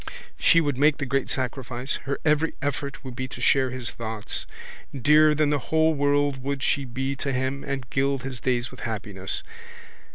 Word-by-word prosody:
She 170 - +5
would 145 -4 -1
make 150 0 +5
the 140 - -2
great 135 +1 0
sacrifice. 130 0 -2
Her 140 - 0
every 155 +1 +2
effort 140 0 -3
would 130 -2 -6
be 130 0 -3
to - - -9
share 130 -2 +3
his 125 -2 -3
thoughts. 110 -2 -4 0.5
Dearer 150 +3 +6
than 150 -1 +2
the 145 - +2
whole 160 0 +4
world 145 -1 +1
would 140 0 -3
she 140 -1 +1
be 130 +2 -2
to 140 - -2
him 130 +2 -1
and 135 -2 -4
gild 135 0 +1
his 130 -2 -4
days 120 -2 0
with 130 - -12
happiness. 105 -4 -4
135 Hz, 185 wpm, -25 LUFS, 125-145 Hz, 0.5 s, Dearer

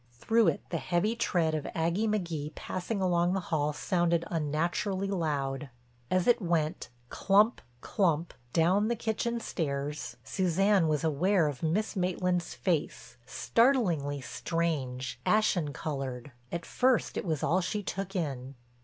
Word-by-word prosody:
Through 225 - +2
it - - +1
the 165 - -1
heavy 185 +8 0
tread 175 -8 +1
of 155 -2 -2
Aggie 170 +7 +1
McGee 170 -8 -2
passing 190 +2 -3
along 175 0 +2
the 195 - +1
hall 150 -4 0
sounded 170 +1 +1
unnaturally 170 +5 -1
loud. 145 -7 -2 0.4
As 185 -1 +2
it 240 -1 +4
went 165 -5 -1 0.2
clump, 205 +4 +3 0.2
clump, 170 -4 0 0.2
down 185 +8 +3
the 235 - +1
kitchen 235 +1 -1
stairs 145 -7 -3
Suzanne 190 0 +2
was 155 0 0
aware 165 +3 +2
of 145 -4 -4
Miss 190 +9 0
Maitland's 180 -1 0
face, - - -2
startlingly 180 - +2
strange, 135 -6 -2
ashen 180 -8 +2
colored. 135 -2 -5 0.2
At 170 0 -4
first 255 -2 +1
it - - -2
was 160 -6 -2
all 185 +3 +2
she 205 +3 -2
took 195 +1 -4
in. 135 -6 -3
170 Hz, 135 wpm, -30 LUFS, 150-195 Hz, 0.4 s, it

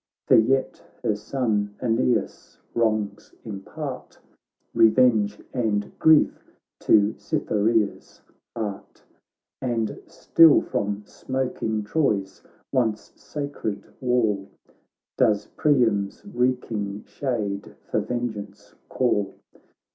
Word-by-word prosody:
For - - +5
yet 130 +4 +2 0.2
her 105 - +1
son 105 -2 -1
Aeneas' 120 +1 0 0.2
wrongs 110 -3 -1
impart 115 +7 -7 0.6
Revenge 110 -3 +4
and 110 -5 0
grief 160 -1 +4 0.3
to 105 0 +4
Cytherea's 105 +1 0 0.4
heart; 105 -3 -6 0.6
And 115 -4 -1
still 165 -3 +6
fromsmoking 110 +2 -3
Troy's 105 -8 0 0.3
oncesacred 115 -1 -3 0.2
wall 110 -6 +1 0.7
Does 105 -1 +3
Priam's 115 - +1
reeking 120 - -1
shade 105 -7 -3
for - - -1
ven 120 0 -2
geance 105 0 -10 0.2
call. 105 -6 0
110 Hz, 80 wpm, -24 LUFS, 105-125 Hz, 0.7 s, still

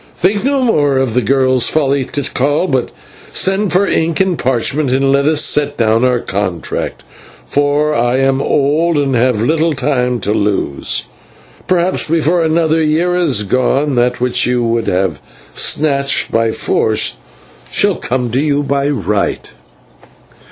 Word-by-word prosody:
Think 200 +4 0
no 275 0 +1
more 145 - +2
of 130 -4 0
the 125 - +2
girl's 130 +1 +2
folly, 140 -3 0
Tikal, 145 +3 -1
but 130 -5 -1 0.4
send 195 0 0
for 185 +4 +3
ink 160 -3 0
and 190 -2 +1
parchment 130 +2 0
and 135 +1 +2
let 140 0 +2
us 155 0 +2
set 145 -1 0
down 115 0 +2
our 125 -1 +2
contract, 95 -6 -4 0.4
for 145 +1 0
I 120 -1 +1
am 135 0 +1
old 150 +5 +1
and 140 -2 0
have 120 -2 +1
little 160 +4 +1
time 125 -3 -1
to 105 - -1
lose; 95 - -1 0.6
and - - -26
perhaps, 180 0 0
before 165 +2 +1
another 160 0 +1
year 160 +3 +1
is 150 -12 +1
gone, 130 +6 0
that 125 0 +1
which 125 0 0
you 125 -1 0
would 115 0 -1
have 95 +1 -1 0.3
snatched 140 -2 +1
by 115 0 +1
force 110 -1 -1 0.6
shall - - +1
come 125 -1 -2
to 125 - 0
you 145 0 0
by 140 0 0
right." 105 - -2
140 Hz, 150 wpm, -14 LUFS, 125-155 Hz, 0.6 s, for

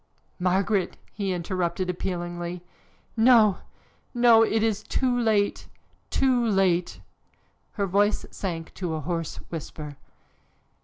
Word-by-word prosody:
"Margaret!" 185 +1 +1 0.2
he 200 -2 -2
interrupted 180 +1 -2
appealingly. 175 -1 -4 0.5
"No! 225 -4 +5 0.6
no! 240 -2 +6
It 220 -1 +2
is 215 -2 0
too 250 +3 0
late, 220 -4 +1 0.4
too 255 -3 +2
late!" 190 -5 +1 0.7
Her 200 - -1
voice 205 +3 +1
sank 165 -4 -5
to 175 -4 -3
a - - -3
hoarse 165 0 -3 0.2
whisper. 150 -3 -7
190 Hz, 105 wpm, -26 LUFS, 175-220 Hz, 0.7 s, no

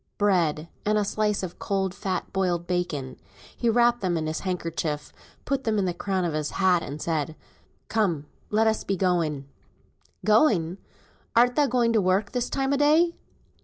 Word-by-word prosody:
Bread, 170 -6 +1 0.2
and 215 +1 +2
a 210 - +1
slice 210 -1 0
of 180 -1 -6
cold 190 -2 -1
fat 190 -1 -3
boiled 180 -3 0
bacon. 160 -8 -2 0.4
He 235 - 0
wrapped 240 +1 +3
them 180 -3 0
in 160 - -2
his 155 0 -2
handkerchief, 165 -5 -3 0.3
put 275 -1 -1
them 220 -2 0
in 200 - +1
the 180 - -1
crown 185 +1 -1
of 165 - -1
his 150 -1 -1
hat, 185 -3 +4
and 145 -1 -6
said 155 -1 -2 0.5
"Come, 185 -10 0 0.2
let's 220 +1 +2
be 195 - -1
going." 165 -7 0 0.8
"Going 205 - +3 0.6
art 245 +1 +5
thou 295 -2 +3
going 240 -2 +2
to 220 - +3
work 190 +2 +1
this 245 -1 -1
time 270 0 0
o' - - +2
day?" 310 +4 +4
190 Hz, 170 wpm, -26 LUFS, 170-220 Hz, 0.8 s, art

